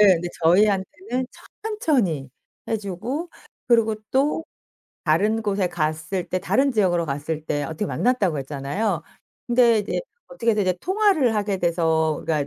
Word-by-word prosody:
예. 210 Hz, -, +8 dB
근데 175 Hz, +1 st, -3 dB
저희한테는 210 Hz, -, +2 dB, 0.4 s
천천히 245 Hz, -, 0 dB, 0.4 s
해 225 Hz, -, +1 dB
주고 225 Hz, -, -4 dB, 0.4 s
그리고 225 Hz, -2 st, +4 dB
또 290 Hz, +4 st, +1 dB, 0.6 s
다른 210 Hz, +8 st, +2 dB
곳에 200 Hz, -3 st, 0 dB
갔을 160 Hz, +2 st, -2 dB
때 185 Hz, -, 0 dB
다른 265 Hz, +8 st, +2 dB
지역으로 175 Hz, -6 st, +2 dB
갔을 150 Hz, +2 st, -3 dB
때 145 Hz, 0 st, -1 dB
어떻게 160 Hz, +6 st, -3 dB
만났다고 205 Hz, -, +1 dB
했잖아요. 145 Hz, +7 st, -2 dB, 0.4 s
근데 240 Hz, -2 st, +4 dB
이제 205 Hz, -, -2 dB, 0.3 s
어떻게 235 Hz, -3 st, 0 dB
해서 210 Hz, -, 0 dB
이제 185 Hz, -1 st, +1 dB
통화를 375 Hz, -, +2 dB
하게 205 Hz, -2 st, 0 dB
돼서 160 Hz, -3 st, +1 dB
우리가 150 Hz, -3 st, 0 dB
195 Hz, 320 characters per minute, -23 LUFS, 165-240 Hz, 0.6 s, 예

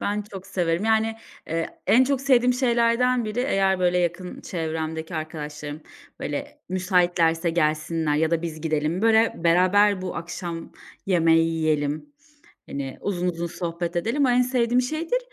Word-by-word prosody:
Ben 210 Hz, +1 st, -1 dB
çok 190 Hz, -1 st, -8 dB
severim, 175 Hz, 0 st, -1 dB
yani, 220 Hz, 0 st, +2 dB, 0.3 s
eee, 165 Hz, +1 st, -3 dB
en 255 Hz, +3 st, +6 dB
çok 275 Hz, -1 st, 0 dB
sevdiğim 250 Hz, -2 st, +4 dB
şeylerden 240 Hz, -1 st, +2 dB
biri 215 Hz, +3 st, -2 dB
eğer, 195 Hz, -7 st, +2 dB
böyle, 180 Hz, 0 st, +2 dB
yakın 180 Hz, +1 st, -2 dB
çevremdeki 160 Hz, 0 st, -4 dB
arkadaşlarım, 150 Hz, -1 st, -6 dB, 0.4 s
böyle, -, -, -5 dB
müsaitlerse 175 Hz, -3 st, +2 dB
gelsinler 155 Hz, -1 st, 0 dB
ya 160 Hz, +1 st, +1 dB
da 170 Hz, 0 st, 0 dB
biz 155 Hz, -2 st, -5 dB
gidelim, 155 Hz, +4 st, -1 dB
böyle, 225 Hz, 0 st, +4 dB
beraber 185 Hz, +3 st, +4 dB
bu 185 Hz, -, -4 dB
akşam 170 Hz, 0 st, -6 dB, 0.3 s
yemeği 165 Hz, -3 st, +4 dB
yiyelim, 155 Hz, -, -1 dB, 0.6 s
hani, 135 Hz, -1 st, -5 dB
uzun 180 Hz, -3 st, -1 dB
uzun 170 Hz, 0 st, -3 dB
sohbet 170 Hz, 0 st, -4 dB
edelim. 235 Hz, +11 st, +1 dB
O 255 Hz, -, +2 dB
en 245 Hz, +1 st, +4 dB
sevdiğim 250 Hz, -1 st, +2 dB
şeydir. 315 Hz, -, -1 dB
180 Hz, 145 wpm, -24 LUFS, 165-225 Hz, 0.6 s, en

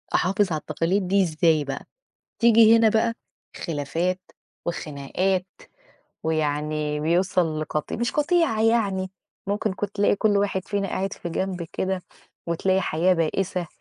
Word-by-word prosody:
أحافظ 195 Hz, +1 st, +2 dB
على 155 Hz, -, 0 dB
التقاليد 175 Hz, +5 st, -1 dB
دي 195 Hz, +1 st, +3 dB
إزاي 160 Hz, -2 st, +2 dB
بقى؟ 140 Hz, -1 st, -5 dB, 0.5 s
تيجي 230 Hz, -1 st, +7 dB
هنا 225 Hz, -1 st, +5 dB
بقى 225 Hz, +1 st, +2 dB, 0.4 s
خلافات 165 Hz, +4 st, -2 dB, 0.5 s
وخناقات، 170 Hz, +4 st, -2 dB, 0.8 s
ويعني 150 Hz, -1 st, -1 dB
بيوصل 170 Hz, 0 st, +1 dB
لقط 155 Hz, -1 st, -3 dB
مش 235 Hz, +1 st, -1 dB
قطيعة 300 Hz, -7 st, +2 dB
يعني، 200 Hz, -5 st, +1 dB, 0.4 s
ممكن 205 Hz, 0 st, -1 dB
كنت 205 Hz, +1 st, -5 dB
تلاقي 205 Hz, 0 st, +3 dB
كل 205 Hz, 0 st, +2 dB
واحد 195 Hz, -2 st, -1 dB
فينا 200 Hz, -1 st, -1 dB
قاعد 195 Hz, +1 st, -2 dB
في 175 Hz, -, -7 dB
جنب 185 Hz, +1 st, -2 dB
كده 190 Hz, -1 st, -1 dB, 0.5 s
وتلاقي 185 Hz, +3 st, +1 dB
حياة 180 Hz, +2 st, +2 dB
بائِسة 180 Hz, +2 st, -1 dB
185 Hz, 130 wpm, -24 LUFS, 160-205 Hz, 0.8 s, تيجي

